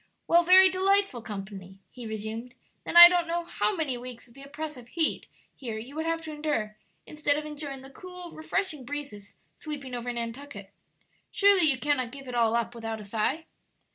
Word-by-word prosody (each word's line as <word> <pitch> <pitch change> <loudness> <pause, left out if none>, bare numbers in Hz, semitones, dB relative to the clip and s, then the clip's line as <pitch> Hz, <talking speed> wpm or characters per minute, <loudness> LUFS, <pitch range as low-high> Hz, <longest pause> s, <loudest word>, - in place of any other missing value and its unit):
"Well, 340 +1 +5
very 370 +2 +8
delightful 380 -7 +1
company," 195 -3 -8
he 245 -2 -9
resumed; 220 +3 -6 0.3
"then - - 0
I 345 0 +14
don't 350 -1 +1
know 340 0 -2
how 410 - -1
many 285 -8 -2
weeks 250 0 -10
of 235 - -21
the 275 - -14
oppressive 285 -3 -7
heat 320 +4 -1 0.3
here 230 -5 -6
you 245 +6 -9
would 320 +1 -3
have 330 0 -1
to 315 - -7
endure, 295 -9 -2 0.3
instead 300 -1 0
of 305 - -4
enjoying 290 -3 -6
the 270 - -12
cool, 360 +2 -9
refreshing 315 -2 -3
breezes 250 -7 -7 0.2
sweeping 280 -4 -7
over 245 0 -3
Nantucket. 230 -3 -7 0.6
Surely, 395 -5 +4
you 270 - +1
cannot 260 -4 -1
give 275 0 -10
it 250 - -7
all 230 -1 +2
up 235 0 -1
without 225 -1 -5
a - - -9
sigh?" 225 +10 -2
275 Hz, 185 wpm, -27 LUFS, 230-320 Hz, 0.6 s, I